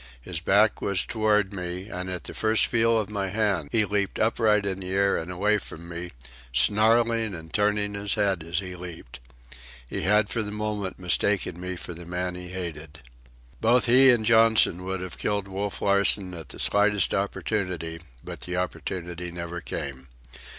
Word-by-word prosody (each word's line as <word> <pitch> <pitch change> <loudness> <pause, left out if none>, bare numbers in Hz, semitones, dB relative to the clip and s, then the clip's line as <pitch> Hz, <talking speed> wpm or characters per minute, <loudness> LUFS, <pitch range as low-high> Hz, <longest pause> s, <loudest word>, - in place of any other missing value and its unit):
His 80 +7 -4
back 100 +6 +3
was 100 -2 0
toward 105 -3 +1
me, 90 0 -5
and 90 -2 -5
at 90 -1 -4
the - - -4
first 110 0 +2
feel 115 0 +2
of 105 - -2
my 100 -2 -3
hand 100 -6 0
he 110 -2 +3
leaped 100 -1 -1
upright 110 -2 +2
in 95 -1 -2
the 90 -1 -6
air 100 +1 +2
and 80 - -4
away 105 +4 +1
from 85 -3 -10
me, 85 +1 -6 0.4
snarling 110 - +3
and 80 -1 -11
turning 105 0 +1
his 100 0 -1
head 100 -4 +1
as 85 +1 -4
he 90 -1 -3
leaped. 85 -9 -10 0.7
He - - -4
had 105 +1 +3
for 115 - -2
the 105 -1 -5
moment 105 -2 -3
mistaken 90 -1 0
me 90 0 -4
for 85 - -7
the 85 0 -11
man 90 +1 -2
he 90 0 -7
hated. 80 -4 -6 0.6
Both 120 +3 +4
he 130 +2 +7
and 120 -3 +4
Johnson 110 -5 +4
would 95 0 -3
have 90 -1 -7
killed 100 -1 -1
Wolf 100 +1 -4
Larsen 100 -1 +3
at 80 -5 -9
the - - -8
slightest 105 -2 +2
opportunity, 90 -4 -2 0.2
but - - -8
the 90 0 -4
opportunity 90 -1 -4
never 85 0 -6
came. 65 -4 -5
95 Hz, 180 wpm, -26 LUFS, 90-105 Hz, 0.7 s, he